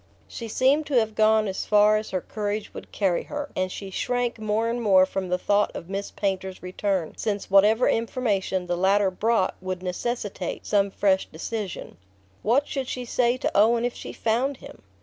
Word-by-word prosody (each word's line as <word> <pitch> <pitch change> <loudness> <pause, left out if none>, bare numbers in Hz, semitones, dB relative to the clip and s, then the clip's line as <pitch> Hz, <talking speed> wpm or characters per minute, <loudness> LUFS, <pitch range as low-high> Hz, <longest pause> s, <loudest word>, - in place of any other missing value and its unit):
She 230 - -7
seemed 275 +7 +2
to 285 - -1
have 220 -2 +2
gone 215 0 +3
as 190 - -4
far 210 0 +5
as 215 0 -2
her 185 - -2
courage 210 +1 -4
would - - -10
carry 190 -4 +1
her, 295 -1 -5
and 185 0 -1
she 195 0 -7
shrank 245 +3 -1
more 215 +1 0
and 235 +1 -2
more 190 -4 +5
from 190 -1 -4
the 180 - +1
thought 205 +3 +2
of 170 - -7
Miss 200 +1 -3
Painter's 190 -2 -3
return, 185 -2 -2
since 205 -3 -3
whatever 210 +5 +5
information 210 -5 0
the 175 0 -1
latter 190 +2 +3
brought 215 +1 +1
would 185 -1 -4
necessitate 195 0 -4
some 200 -1 +2
fresh 190 -1 +1
decision. 195 - -6 0.4
What 260 +7 +2
should 270 -3 -3
she 250 -1 -4
say 240 +1 +1
to - - -1
Owen 230 +3 +4
if 245 - -1
she - - -8
found 245 +5 0
him? - - -13
210 Hz, 190 wpm, -25 LUFS, 190-235 Hz, 0.4 s, far